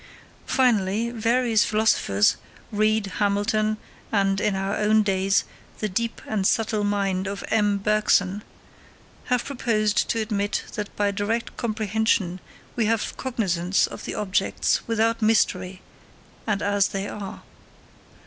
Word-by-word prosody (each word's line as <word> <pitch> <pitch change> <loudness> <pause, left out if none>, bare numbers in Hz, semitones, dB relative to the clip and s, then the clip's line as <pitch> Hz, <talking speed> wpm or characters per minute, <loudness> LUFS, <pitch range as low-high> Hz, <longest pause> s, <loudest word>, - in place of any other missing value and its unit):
Finally, 225 -3 +2
various 235 0 +2
philosophers, 210 - +2 0.3
Reid, 215 0 +2
Hamilton, 210 +1 +1 0.3
and, 195 -2 +1
in 205 - +1
our 195 +1 -1
own 215 +1 +3
days, 195 -1 +2 0.3
the 215 - -2
deep 230 +4 -3
and 200 -3 0
subtle 220 -2 +1
mind 200 -2 0
of 200 0 -5
M. 210 -2 +2
Bergson, 205 -1 +2 0.8
have 250 -1 0
proposed 215 -6 0
to 230 - 0
admit 205 -2 -1
that 210 -2 -4
by 205 -1 +1
direct 210 +3 -2
comprehension 215 -4 0 0.4
we 230 -3 +1
have 225 -1 0
cognisance 195 -8 0
of - - -8
the - - -4
objects 195 -1 0
without 230 0 +1
mystery 190 -4 +1 0.6
and 210 -2 0
as 205 -1 +2
they 195 0 -4
are. 200 -2 -7
210 Hz, 125 wpm, -24 LUFS, 195-220 Hz, 0.8 s, own